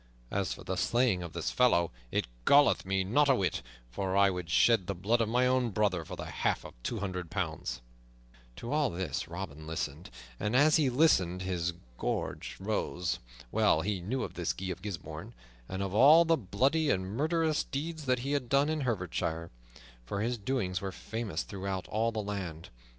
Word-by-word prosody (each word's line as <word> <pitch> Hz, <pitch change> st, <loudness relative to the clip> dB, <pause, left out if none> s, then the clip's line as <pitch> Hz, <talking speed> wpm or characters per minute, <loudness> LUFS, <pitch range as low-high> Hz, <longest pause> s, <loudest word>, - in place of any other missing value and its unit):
As 100 Hz, -1 st, -1 dB
for -, -, -10 dB
the 95 Hz, -1 st, -3 dB
slaying 120 Hz, -3 st, +2 dB
of 85 Hz, -2 st, -7 dB
this 85 Hz, -, -2 dB
fellow, 85 Hz, -10 st, +3 dB, 0.2 s
it -, -, +1 dB, 0.2 s
galleth 140 Hz, -, +5 dB
me 95 Hz, 0 st, +1 dB
not 140 Hz, +10 st, +3 dB
a 135 Hz, -, +6 dB
whit, 95 Hz, -, 0 dB, 0.3 s
for 95 Hz, +7 st, -1 dB
I 100 Hz, 0 st, +5 dB
would 90 Hz, -3 st, -5 dB
shed 105 Hz, +3 st, +4 dB
the 100 Hz, -, -2 dB
blood 110 Hz, +7 st, +1 dB
of 110 Hz, -, +1 dB
my 125 Hz, +2 st, +3 dB
own 125 Hz, -1 st, +2 dB
brother 100 Hz, -5 st, +1 dB
for -, -, -7 dB
the -, -, -6 dB
half -, -, -1 dB
of -, -, -9 dB
two 115 Hz, -, -3 dB
hundred 90 Hz, -4 st, -4 dB
pounds." 80 Hz, -9 st, -3 dB, 0.7 s
To 115 Hz, -, -6 dB
all 150 Hz, -2 st, +2 dB
this 85 Hz, -4 st, -3 dB
Robin 80 Hz, -3 st, -7 dB
listened, 80 Hz, 0 st, -4 dB, 0.3 s
and 105 Hz, +4 st, -1 dB
as 150 Hz, +4 st, +6 dB
he 145 Hz, -4 st, +3 dB
listened 95 Hz, -, +3 dB
his 90 Hz, -2 st, -1 dB, 0.3 s
gorge -, -, -3 dB
rose. 90 Hz, -4 st, -1 dB, 0.3 s
Well -, -, +3 dB
he 100 Hz, -1 st, -2 dB
knew 125 Hz, +9 st, -2 dB
of -, -, -5 dB
this -, -, -1 dB
Guy 95 Hz, 0 st, -4 dB
of 90 Hz, -, -6 dB
Gisbourne, 90 Hz, -, -7 dB, 0.3 s
and 95 Hz, +1 st, -2 dB
of 95 Hz, -1 st, -3 dB
all 150 Hz, +9 st, +8 dB
the 165 Hz, 0 st, +4 dB
bloody 135 Hz, -, +1 dB
and 95 Hz, -6 st, +1 dB
murderous 155 Hz, -, +1 dB
deeds 155 Hz, +2 st, -4 dB
that 130 Hz, -1 st, +2 dB
he 140 Hz, +3 st, -3 dB
had 140 Hz, -4 st, -1 dB
done 140 Hz, +2 st, +3 dB
in 155 Hz, -1 st, -1 dB
Herefordshire, 90 Hz, -8 st, -2 dB, 0.5 s
for 100 Hz, +12 st, -3 dB
his 120 Hz, +1 st, -1 dB
doings 100 Hz, -6 st, -1 dB
were 95 Hz, -1 st, -3 dB
famous 110 Hz, -3 st, -4 dB
throughout 95 Hz, -1 st, -4 dB
all 115 Hz, +2 st, +1 dB
the 110 Hz, -2 st, -3 dB
land. 95 Hz, -6 st, -5 dB
100 Hz, 190 wpm, -31 LUFS, 90-125 Hz, 0.7 s, all